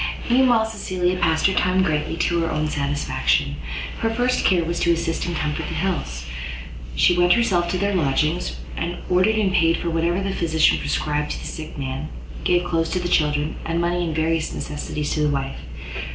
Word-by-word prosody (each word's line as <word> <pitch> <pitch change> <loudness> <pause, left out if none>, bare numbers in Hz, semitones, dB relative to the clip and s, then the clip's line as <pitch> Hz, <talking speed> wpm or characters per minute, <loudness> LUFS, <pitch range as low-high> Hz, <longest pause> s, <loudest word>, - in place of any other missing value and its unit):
Meanwhile 245 -3 +5
Cecilia 185 -4 -1
passed 160 -2 +2
her 190 - +4
time 185 +1 +2
greatly 155 -1 -1
to 170 0 +1
her 165 -1 0
own 155 0 0
satisfaction. 70 - 0 0.4
Her 225 - +1
first 245 +2 +1
care 180 -3 +3
was 170 +1 -2
to 170 - +3
assist 170 0 -1
and 175 - -2
comfort 150 -2 -2
the 165 - -4
Hills. 150 - -2 0.7
She 175 - +4
went 175 0 +5
herself 185 -7 +2
to 185 - 0
their 200 +2 0
lodgings, 155 +1 +1 0.6
ordered 185 +5 +4
and 205 -3 +1
paid 165 -1 +3
for 170 - -2
whatever 170 +2 +1
the 195 0 -2
physician 160 -3 +3
prescribed 150 0 -1
to - - -6
the - - -9
sick 155 -2 -7
man, 135 +2 -4 0.3
gave 175 0 +3
clothes 165 -1 0
to 185 - +1
the 175 - -2
children, 150 -2 +1
and 165 +1 -1
money 175 +1 0
and 160 -2 -2
various 160 0 0
necessaries 150 0 -4
to - - -1
the 150 - +3
wife. 135 -1 -2
170 Hz, 190 wpm, -22 LUFS, 150-180 Hz, 0.7 s, Meanwhile